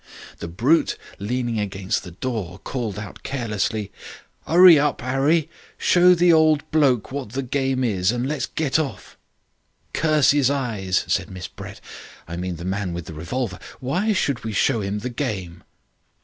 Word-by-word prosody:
"The - - -5
brute 125 - +2 0.2
leaning 120 +2 -2
against 95 -2 -2
the 90 - -8
door 95 -1 -4
called 115 -7 -4
out 105 -2 -8
carelessly, 110 -5 -2 0.6
''Urry 175 -2 +8
up, 145 -4 -1
'Arry. 140 +5 +2 0.3
Show 180 0 +5
the 175 0 +5
old 155 -2 +4
bloke 135 -9 +2
what 135 -6 -5
the 135 +1 -2
game 130 0 0
is, 100 -5 +1
and 120 +1 -2
let's 150 0 -2
get 155 -2 0
off.' 125 -12 -5 0.8
"'Curse 155 -3 +3
'is 140 -3 +3
eyes,' 110 -10 -1
said - - 0
Miss 95 0 -7
Brett - - -10 0.5
I 85 - -6
mean 90 0 -3
the 85 +1 -8
man 95 -1 -2
with 85 -2 -5
the - - -8
revolver 95 +6 -4 0.2
'why 180 +12 0
should 140 - 0
we 110 -1 -4
show 110 +2 +2
'im 100 +1 -2
the - - -1
game?' 95 -10 -4
120 Hz, 165 wpm, -23 LUFS, 95-140 Hz, 0.8 s, Urry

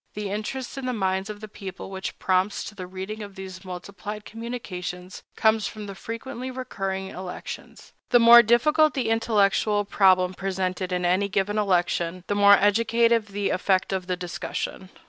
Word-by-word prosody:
The 205 -2 -4
interest 245 +6 -4
in 260 - -4
the 250 - -1
minds 190 -2 -1
of 210 0 -7
the 215 - -7
people 195 -1 -8
which 190 0 -5
prompts 185 +2 +1
to - - -8
the 185 -3 -7
reading 190 +4 -6
of 200 -2 -8
these 190 -1 -8
multiplied 200 +3 -7
communications 185 -6 -6
comes 220 -1 +3
from 215 -1 -7
the 200 - -7
frequently 230 +5 -6
recurring 195 -7 -4
elections. 185 -1 -8 0.2
The 245 - +6
more 235 +1 +10
difficult 300 +7 +3
the 245 -5 0
intellectual 210 -2 +2
problem 185 -2 +4
presented 185 -1 -2
in 180 0 -1
any 185 +3 +2
given 205 +2 0
election, 180 -2 0
the - - -1
more 200 0 +7
educative 230 +2 +3
the 200 0 -2
effect 190 +1 +1
of 185 -1 -3
the 180 -1 -1
discussion. 180 +1 -5
200 Hz, 165 wpm, -25 LUFS, 185-220 Hz, 0.2 s, more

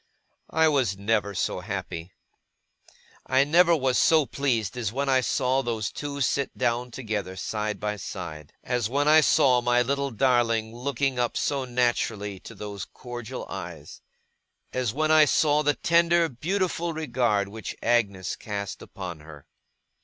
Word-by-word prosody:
I 160 0 +3 0.3
never 105 +2 +2
was 100 - -7
so - - -1
happy. 85 +2 -5 1.2
I 130 +1 +4
never 170 +4 +5
was 130 -4 +1
so 160 -3 +4
pleased 125 -7 -1
as 115 -5 -2
when 140 +4 -2
I 130 -1 +4
saw 130 +1 +1
those 115 -4 -2
two 140 -1 -5
sit 140 +1 0
down 120 +1 0
together, 110 -7 -4
side 105 +2 -3
by 105 0 -2
side. 80 -6 -7
As 120 -3 -1
when 145 +3 +1
I 155 +1 +7
saw 130 -4 +4
my 120 0 +3
little 140 +2 -1
darling 115 -2 +1
looking 135 +1 -1
up 120 -1 0
so 140 -2 -1
naturally 115 -5 -1
to - - -11
those 100 -2 -6
cordial 120 -2 -7
eyes. - - -8 0.7
As 125 -4 0
when 155 +5 0
I 155 -1 +7
saw 150 0 +3
the 145 -1 +2
tender, 170 0 +3
beautiful 170 +4 -1
regard 120 -10 0
which 110 +1 -7
Agnes 105 -6 +1
cast 100 -2 -5
upon 90 -4 -7
her. 75 -2 -13
125 Hz, 150 wpm, -26 LUFS, 105-140 Hz, 1.2 s, I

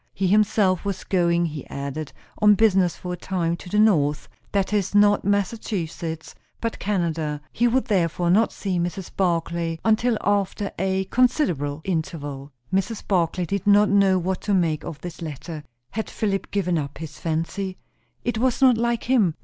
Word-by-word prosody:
He 195 - -1
himself 200 -1 +3
was 200 -2 -3
going, 170 -2 +2
he 150 -4 -6
added, 140 +2 -5 0.3
on 210 -1 +7
business, 190 -4 +3
for 180 -1 -5
a - - -5
time, 170 -2 -1
to 180 - -11
the 210 - -1
north; 155 -9 +3 0.2
that 200 0 0
is, 205 -1 0
not 205 0 +5
Massachusetts, 190 -5 -2 0.3
but 230 -1 -3
Canada. 165 -7 -1
He 240 - +2
would 255 +2 +1
therefore 175 -3 +1
not 220 +5 +4
see 190 -3 -2
Mrs. 175 +2 -4
Barclay 170 -2 0
until 225 +1 +3
after 200 0 0
a 190 0 +1
considerable 170 - +1
interval. 150 -6 -4 0.2
Mrs. 195 +3 -1
Barclay 180 -1 +1
did 200 +3 -3
not 205 +1 +6
know 195 -2 +4
what 185 +1 -2
to 205 - +1
make 165 -4 +1
of 155 - -7
this 175 -1 -8
letter. 155 0 -6 0.3
Had 220 +1 -3
Philip 195 -3 -2
given 180 -4 0
up 140 -2 -5
his 155 -1 -8
fancy? 170 +4 -2 0.5
It 235 -2 -1
was 255 0 +1
not 255 -4 +5
like 235 0 0
him. 220 -11 +2
185 Hz, 165 wpm, -24 LUFS, 165-205 Hz, 0.5 s, on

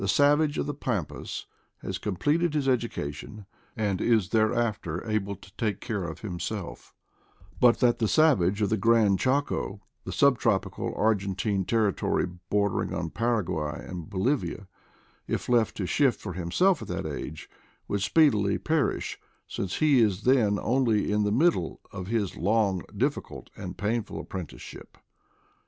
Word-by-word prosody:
savage 145 +7 +3
of - - 0
the 145 - -3
Pampas 110 - -4 0.4
has. 95 0 -4
completed 150 - 0
his 145 -3 0
education, 105 - -2 0.3
and 100 -4 0
is 110 -6 +2
thereafter 110 -5 0
able 100 -2 -1
to 95 0 -17
take 105 -4 -1
care 105 -7 -3
of 80 -1 -7
himself; 95 0 -5 0.6
but 120 -1 +6
that 120 -1 +3
the 110 - +2
savage 105 - +3
of 100 - +1
the 110 - +2
Gran 110 -1 +4
Chaco 130 -4 0
— - - -49
the - - -6
sub - - +4
tropical - - 0
Argentine 100 -2 0
territory 110 -3 +1 0.2
bordering 100 -1 +1
on 85 -2 -3
Paraguay 90 -10 -1
and 85 -4 -7
Bolivia 100 0 -1 0.3
— - - -33 0.2
if - - -2
left 120 -2 +2
to 95 - -2
shift 135 +6 +2
for 95 - -6
himself 115 - +2
at - - -7
that - - -3
age 80 +2 -6 0.4
would 100 - -1
speedily 105 - +3
per 155 -2 +1
ish, - - -6 0.3
since 95 -1 -4
he 150 -4 +4
is 105 -2 +1
then 120 -6 +3
only 115 -5 +2
in 105 0 +2
the 105 - +1
middle 125 - +2
of 90 0 -6
his 105 -4 -1
long, 100 0 +1 0.2
difficult, - - -2
and 95 -3 -7
painful 110 +2 -2
apprenticeship. 90 -5 -8
105 Hz, 150 wpm, -27 LUFS, 95-120 Hz, 0.6 s, but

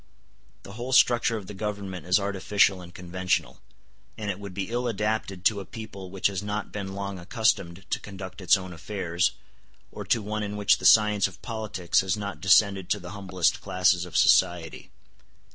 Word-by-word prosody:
The - - -11
whole 120 +5 -5
structure 120 -2 +4
of 105 - -8
the 105 - -9
Government 100 -3 -5
is 90 +3 +4
artificial 100 -1 +1
and 90 -1 -11
conventional; 90 +1 -2 0.6
and 105 -1 -2
it 95 - -7
would 100 -3 -8
be 100 +3 -4
ill 120 +1 -1
adapted 105 -3 -2
to 110 -3 +3
a - - -6
people 100 -5 -9
which 95 0 -7
has 100 -2 +2
not 105 +1 -4
been 100 -2 -5
long 100 -1 -5
accustomed 95 -2 0
to - - 0
conduct 95 -1 -9
its 90 +1 +5
own 95 -1 -8
affairs, 85 +1 -1 0.6
or - - -7
to 115 - +1
one 105 +1 -3
in 105 0 -4
which 105 0 +3
the - - -6
science 105 -2 +5
of - - -13
politics 110 -6 0
has 95 +1 -1
not 100 -1 -6
descended 95 -1 +4
to 105 - +1
the 90 -2 -9
humblest 95 -3 0
classes 90 -1 +2
of 90 -2 -4
society. 85 -2 +3
100 Hz, 185 wpm, -26 LUFS, 90-105 Hz, 0.6 s, its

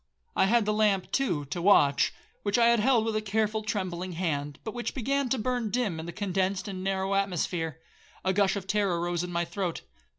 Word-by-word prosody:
I 190 - +4
had 230 +1 +3
the 210 - +1
lamp, 210 -3 +2
too, 175 - 0
to 150 +5 -4
watch, 145 -7 +4 0.3
which 205 +1 +1
I 235 -1 +5
had 235 -1 +4
held 230 0 +3
with 225 -1 -1
a 215 - +1
careful 215 +1 0
trembling 185 -4 -3
hand, 145 -5 -2
but 220 - -5
which 240 -1 -4
began 275 +1 0
to 265 - +1
burn 245 -1 -1
dim 210 -8 -1
in 160 - -6
the - - -4
condensed 195 -1 -1
and 185 -2 -5
narrow 195 0 0
atmosphere. 175 -4 -1 0.5
A 190 - +2
gush 195 0 +3
of 195 -2 -4
terror 195 -3 +1
rose 175 0 -1
in 180 - -5
my 170 0 0
throat. 175 0 -3
195 Hz, 210 wpm, -28 LUFS, 175-215 Hz, 0.5 s, I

